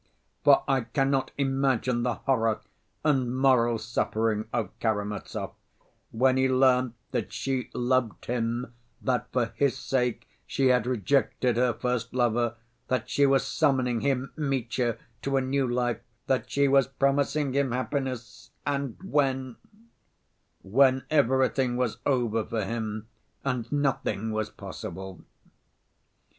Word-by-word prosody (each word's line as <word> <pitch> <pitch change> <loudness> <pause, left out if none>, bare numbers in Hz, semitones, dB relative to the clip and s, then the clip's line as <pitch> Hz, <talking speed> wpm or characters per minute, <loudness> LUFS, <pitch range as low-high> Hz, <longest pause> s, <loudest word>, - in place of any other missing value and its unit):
For 145 -1 +6
I 135 -2 +2
cannot 135 +3 0
imagine 135 -3 +1
the 120 -1 0
horror 115 -5 +1 0.4
and 130 -4 +2
moral 125 -3 +4
suffering 110 -1 -1
of 120 -3 -1
Karamazov 105 -2 -2 0.6
when 130 +3 +2
he 130 0 +3
learnt 130 -2 +3 0.2
that - - -2
she 130 +2 -2
loved 125 -2 0
him, 120 0 -2 0.3
that 125 -1 -1
for 120 -3 0
his 140 -2 +1
sake 125 -3 -1 0.2
she 135 -1 +2
had 125 -2 +3
rejected 125 +1 +1
her 125 +1 +3
first 125 -1 -2
lover, 120 -1 +1 0.3
that 130 - -1
she 140 0 +4
was 135 0 +3
summoning 130 -6 +1
him, 135 -1 0
Mitya, 125 -5 -1 0.2
to 135 0 0
a - - +3
new 130 0 0
life, 120 -2 0 0.3
that 130 -2 0
she 140 0 +2
was 135 -1 +4
promising 140 +1 +1
him 140 -2 +1
happiness—and 130 0 -3
when? 135 -7 0 1.1
When 130 +6 +4
everything 130 -3 +2
was 120 -3 -1
over 120 -5 +1
for 110 -2 -2
him 110 -1 -3 0.4
and 125 -4 -2
nothing 135 -6 0
was 110 0 -1
possible! 95 -2 -8
125 Hz, 125 wpm, -27 LUFS, 115-135 Hz, 1.1 s, For